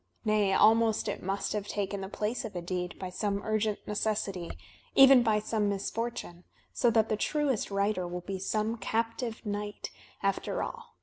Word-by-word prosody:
Nay, 210 -2 +3
almost 220 +2 +4
it - - -3
must 195 +2 -2
have 205 -1 -3
taken 200 -1 -2
the 190 - -5
place 215 +6 -2
of 220 -5 -7
a 175 - -2
deed 180 0 -3
by 185 -1 -5
some 200 +2 -1
urgent 215 -1 -1
necessity, 205 -4 -1 0.5
even 270 -2 +9
by 220 -3 +3
some 210 -1 0
misfortune, 200 -3 -3 0.3
so 240 - +3
that 225 -1 +3
the 215 - +1
tmest 285 -1 0
writer 200 -2 0
will 175 0 -5
be 190 +1 -5
some 215 +4 -1
captive 230 +1 -2
knight, 205 0 -4 0.3
after 195 0 0
all. - - -8
210 Hz, 170 wpm, -30 LUFS, 195-225 Hz, 0.5 s, even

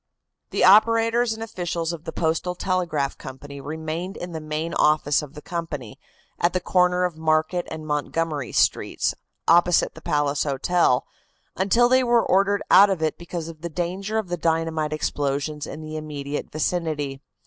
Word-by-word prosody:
The - - 0
operators 230 +3 +5
and 225 0 -4
officials 175 -6 -3
of 165 -1 -9
the - - -4
Postal 165 +2 -1
Telegraph 170 -7 -1
Company 140 +1 -9
remained 160 +5 -5
in 175 - -6
the 160 -1 -5
main 155 +2 -3
office 150 -1 +3
of 150 0 -10
the 150 - -10
company, 160 -9 -5 0.4
at 175 - +2
the 185 - +1
corner 180 0 +2
of 175 -3 -2
Market 160 +2 +1
and 155 -1 -7
Montgomery 150 -2 -2
Streets, - - +1 0.3
opposite 175 +1 +4
the - - -13
Palace 145 -1 0
Hotel, 140 -1 +1 0.5
until 215 +6 +3
they 255 +1 +4
were 240 -1 +3
ordered 200 +2 +2
out 200 +1 +8
of 185 -5 -1
it 155 - -1
because 170 -1 -5
of 160 -2 -10
the 170 - -4
danger 185 +6 -3
of 215 -5 -2
the 175 - -2
dynamite 160 -1 0
explosions 145 0 -2
in 155 - -7
the 155 0 -6
immediate 145 -2 -5
vicinity. 155 -4 -2
165 Hz, 165 wpm, -24 LUFS, 150-180 Hz, 0.5 s, out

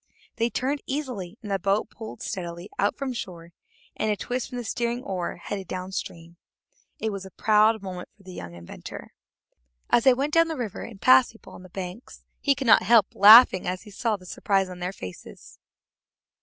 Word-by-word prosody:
They 230 +1 +1
turned 275 +4 -2
easily, 250 -10 -4
and 205 - -6
the 195 - 0
boat 200 +4 0
pulled 220 -1 -9
steadily 175 +1 -6
out 205 - +1
from 270 -2 -3
shore, 175 -7 -8 0.4
and 215 - -1
at - - +3
a - - -5
twist 250 +3 -3
from 250 - -6
the 245 - -4
steering 235 +2 -2
oar 185 -3 -3
headed 190 +1 -6
down 185 0 -5
stream. 170 -3 -7 0.6
It 220 - -2
was 195 -1 -5
a 190 - -10
proud 215 +2 +3
moment 180 -2 -7
for 200 - -22
the 185 -1 -11
young 85 - -8
inventor. 85 0 -10 0.8
As 235 - +4
they 260 -2 +7
went 285 +4 -2
down 330 0 +5
the 320 -2 -4
river 230 -6 -4
and 220 -4 -9
passed 255 0 +5
people 225 - -15
on - - -11
the 185 - -13
banks, 185 +5 -8 0.2
he 280 -2 +2
could 275 - -4
not 230 - +7
help 215 +1 +4
laughing 210 -2 +8
as 180 0 -3
he 210 - -13
saw 220 +2 -1
the 185 - -17
surprise 195 +1 0
on 180 -1 -9
their 180 +1 -3
faces. 95 - -11
205 Hz, 205 wpm, -25 LUFS, 185-240 Hz, 0.8 s, laughing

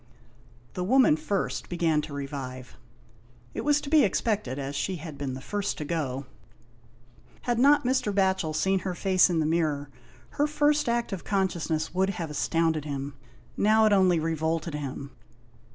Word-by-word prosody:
The 180 - -3
woman 250 - +5
first 170 +5 -3
began 165 -3 +1
to 150 - -8
revive. 135 -3 -6 0.8
It - - -3
was 295 0 +3
to 280 - -6
be 310 -3 +6
expected, 200 - 0
as 140 0 -4
she 185 +6 -1
had 160 -2 -8
been 140 -2 -4
the 130 - -8
first 205 +6 -3
to 150 - -4
go. 140 -4 -3 1.2
Had 240 -1 0
not 285 +1 +5
Mr. 255 -4 +1
Batchel 190 -5 +1
seen 190 +4 +2
her 185 -1 -4
face 185 0 +3
in 175 - 0
the 155 - +1
mirror, 155 -3 0 0.5
her 295 - +4
first 295 -2 +2
act 235 -2 -1
of 185 - -5
consciousness 170 -6 -1
would 190 +1 +1
have 170 -5 -4
astounded 160 0 0
him. 140 -1 -4 0.4
Now 220 +1 +4
it 215 - +4
only 185 -4 +4
revolted 160 0 -1
him. 140 -1 -5
170 Hz, 165 wpm, -27 LUFS, 150-200 Hz, 1.2 s, be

